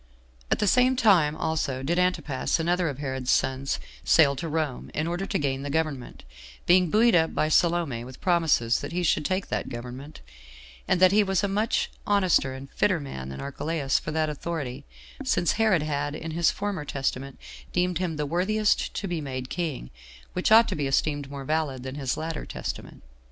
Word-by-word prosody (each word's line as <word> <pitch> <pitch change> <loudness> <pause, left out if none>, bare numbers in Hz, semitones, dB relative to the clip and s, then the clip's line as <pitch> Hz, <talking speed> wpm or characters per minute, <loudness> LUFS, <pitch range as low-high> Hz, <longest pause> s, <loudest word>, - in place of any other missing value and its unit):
4. - - +4
At - - 0
the - - 0
same 255 +5 +4
time 185 -11 +4
also 155 -5 -2
did 170 +6 0
Antipas, 175 -6 0
another 175 +1 +1
of 140 - -5
Herod's 130 -3 -4
sons, 130 +1 +1 0.2
sail 145 -3 +5
to 165 - -4
Rome, 155 -4 -2
in 155 - 0
order 175 +3 -2
to - - 0
gain 135 -2 -1
the 145 - -5
government; 150 -4 -3 0.4
being 180 0 +5
buoyed 230 +6 +4
up 165 -1 +3
by 155 - +1
Salome 165 -8 +2
with 130 +1 -11
promises 165 -10 +2
that - - -6
he 180 +1 -1
should 160 - +2
take 185 +5 -1
that - - -2
government; 125 +5 -8 0.7
and - - +2
that 185 0 +6
he 210 +2 +5
was 195 -1 0
a - - +2
much 210 +3 0 0.2
honester 185 -10 +2
and 135 +1 -10
fitter 185 -5 +1
man 65 - -7
than 65 - -7
Archelaus 140 0 -1
for - - -7
that 155 0 0
authority, 150 -4 -5 0.4
since 175 - +2
Herod 215 -8 +2
had, 145 -1 -2
in 160 +1 -6
his 165 0 +2
former 200 -6 -3
testament, 135 -1 -3 0.3
deemed 180 -1 0
him 175 -3 -2
the 150 0 -2
worthiest 195 +7 +1
to 200 - -3
be 175 -3 -2
made 130 -2 -5
king, 160 - -3 0.4
which 180 +3 0
ought 225 +1 +8
to - - -2
be 145 -2 -1
esteemed 145 0 0
more 140 -1 -7
valid 150 -4 -1
than 130 0 -5
his 135 -3 -2
latter 160 0 -4
testament. - - -6
155 Hz, 195 wpm, -26 LUFS, 135-180 Hz, 0.7 s, ought